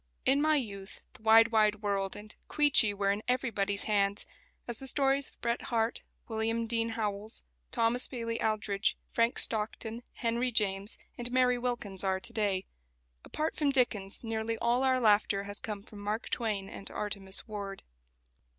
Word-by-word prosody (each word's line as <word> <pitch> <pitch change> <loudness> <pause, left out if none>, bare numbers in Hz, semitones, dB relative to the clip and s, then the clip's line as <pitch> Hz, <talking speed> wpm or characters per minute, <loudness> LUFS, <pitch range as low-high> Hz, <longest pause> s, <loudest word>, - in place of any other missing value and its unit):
In 275 +2 +3
my 310 0 +3
youth 200 -8 -5
"The - - -17
Wide, 225 +1 +6
Wide 215 -1 +2
World" 195 -1 -1
and 215 +1 -11
"Queechy" 290 -8 +5
were 200 -1 0
in 200 +1 -2
everybody's 215 -6 0
hands; 200 -1 +1 0.4
as 240 -2 -5
the 270 - -5
stories 275 0 +2
of - - -25
Bret 235 0 -1
Harte, 230 -1 0 0.3
William 225 +1 -1
Dean 230 0 0
Howells, 215 -1 -4 0.3
Thomas 235 +2 +2
Bailey 230 -2 -4
Aldrich, 210 -2 0
Frank 230 +1 0
Stockton, 220 +1 0
Henry 235 +2 -1
James, 200 -2 0 0.2
and 240 0 -3
Mary 250 -1 +2
Wilkins 235 -6 -2
are 190 -1 0
to 235 +4 -3
day. 200 -4 0 0.6
Apart 310 +1 -3
from 295 -2 +1
Dickens, 230 -8 +6
nearly 225 0 -3
all 240 +3 +1
our 260 -1 +2
laughter 205 -3 +3
has 205 +1 -6
come 210 -2 -6
from 210 -1 -13
Mark 210 +3 -4
Twain 210 -5 -2
and 195 - -8
Artemus 200 -2 0
Ward. 200 -2 -6
220 Hz, 160 wpm, -30 LUFS, 205-240 Hz, 0.6 s, Wide